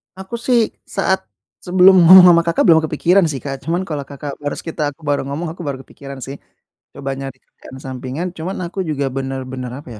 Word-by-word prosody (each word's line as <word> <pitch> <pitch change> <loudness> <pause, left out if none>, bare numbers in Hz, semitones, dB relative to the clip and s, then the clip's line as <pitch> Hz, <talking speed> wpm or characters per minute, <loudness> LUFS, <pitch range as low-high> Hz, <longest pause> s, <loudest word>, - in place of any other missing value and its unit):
Aku 190 +5 -7
sih, 245 -2 +4 0.4
saat 190 -1 +1 0.4
sebelum 185 +1 +5
ngomong 185 +1 +10
sama 170 0 +5
Kakak 170 0 +1
belum 160 -1 +7
kepikiran 170 +5 +2
sih 140 -4 -4
Kak. 135 -1 -5
Cuman 175 +3 -1
kalau 150 -6 -5
Kakak 140 0 -7
barus 145 0 -4
kita 165 -1 -6
aku 160 - -30
baru 145 -1 0
ngomong, 150 +5 -4
aku 175 - -10
baru 135 -1 -4
kepikiran 140 -1 -11
sih, 135 +1 -7 0.6
coba 140 -1 -5
nyari 135 -1 -6
kerjaan 130 - -14
sampingan. 130 +6 -5
Cuman 180 +5 -5
aku 180 +3 -7
juga 140 -2 -1
benar-benar 130 -1 -5
apa - - -13
150 Hz, 190 wpm, -18 LUFS, 135-175 Hz, 0.6 s, ngomong